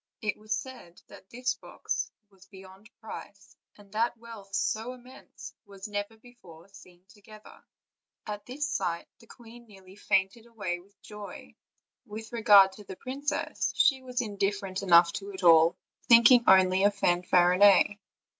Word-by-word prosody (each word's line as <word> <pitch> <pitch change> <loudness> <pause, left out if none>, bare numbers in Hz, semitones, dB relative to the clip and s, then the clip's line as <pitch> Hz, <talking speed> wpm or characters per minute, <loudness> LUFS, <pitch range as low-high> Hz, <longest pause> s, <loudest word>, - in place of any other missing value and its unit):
It 215 -2 -2
was 215 0 -4
said 210 -6 -10
that 190 - -16
this 250 +1 -2
box - - -5 0.2
was 190 -1 -21
beyond 190 +2 -16
price, 210 -2 -11 0.2
and 205 -1 -19
that 230 +3 -1
wealth 220 -4 -11
so 225 +3 -2
immense 255 +1 -14
was 200 -1 -11
never 205 +1 -5
before 195 -8 -17
seen 180 -2 -18
together. 210 +2 -17 0.6
At 210 0 -7
this 280 +4 -4
sight 170 0 -3
the 230 - -20
queen 235 +1 -15
nearly 190 -2 -17
fainted 200 +3 -1
away 205 -6 -5
with 200 +3 -24
joy; 210 -1 -11 0.5
with 220 +2 -9
regard 205 -4 +6
to 210 - -13
the 190 - -10
princess, 280 +7 -4
she 265 -2 +3
was 250 0 -4
indifferent 200 -3 -3
enough 170 -3 +5
to 200 0 -7
it 190 - -9
all, 165 -1 +6 0.3
think 235 +1 +7
ing 245 -2 +5
only 190 0 +5
of 205 0 +2
Fanfarinet. 180 +3 +3
205 Hz, 150 wpm, -28 LUFS, 190-230 Hz, 0.6 s, think